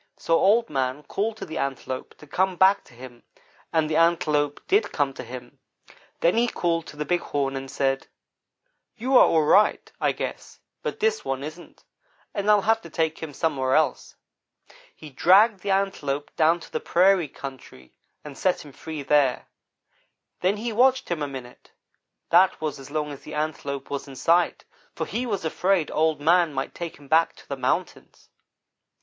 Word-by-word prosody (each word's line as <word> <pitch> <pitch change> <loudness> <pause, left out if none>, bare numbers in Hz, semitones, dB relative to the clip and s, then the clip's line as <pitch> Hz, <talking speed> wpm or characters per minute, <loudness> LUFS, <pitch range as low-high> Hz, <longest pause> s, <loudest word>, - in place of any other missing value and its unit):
So 165 - +1
Old 225 +4 +4
man 135 0 -2
called 215 +6 -2
to - - -6
the 160 - -5
Antelope 135 -1 -4
to - - -14
come 185 +5 0
back 190 +3 +4
to 125 - -19
him, 120 -1 -12 0.5
and 160 -2 +2
the 155 0 0
Antelope 150 -3 +2
did 405 +4 +2
come 140 -2 0
to 130 - -8
him. 125 0 -10 0.6
Then 175 +6 +3
he 240 +1 +3
called 165 -6 -1
to 150 - -11
the 150 - -3
Big 175 +2 +1
Horn, 140 -4 -2
and 135 0 -5
said: 135 0 -1 0.9
"'You 255 +4 0
are - - +8
all 160 -2 +3
right, 200 +8 +3
I - - +3
guess, - - -6 0.2
but - - -4
this 445 0 +1
one 135 0 -3
isn't, 155 +4 -10 0.5
and 200 +1 -1
I'll 210 -1 +5
have 225 +1 +2
to 170 - -11
take 160 0 -1
him 160 -2 -5
somewhere 135 -3 0
else.' 155 -5 0 0.8
"He 155 -2 -12
dragged 195 - +5
the 200 - -5
Antelope 170 -8 -1
down 165 +2 +3
to - - -13
the - - -2
prairie 185 -1 +3
country, 130 - -10 0.3
and 150 -2 -9
set 180 +1 0
him 145 - -12
free 155 +1 -7
there. 140 -3 +2 0.9
Then 190 +3 +1
he 230 +2 -3
watched 260 +3 +3
him 170 -3 -2
a 145 - -1
minute; 130 -3 -10 0.6
that 180 +2 +5
was 155 -3 -3
as 135 - -11
long 150 0 -2
as 140 - -9
the - - -9
Antelope 145 -3 -4
was 140 0 -4
in 135 - -10
sight, 170 +6 +2 0.3
for - - -2
he 245 +2 -3
was 200 -7 -2
afraid 180 +1 +1
Old 155 -1 +1
man 170 +1 +3
might 135 - -3
take 170 -1 -6
him 145 -1 -16
back 160 +3 +3
to - - -18
the 140 - -3
mountains. 130 -1 -3
155 Hz, 185 wpm, -25 LUFS, 140-190 Hz, 0.9 s, are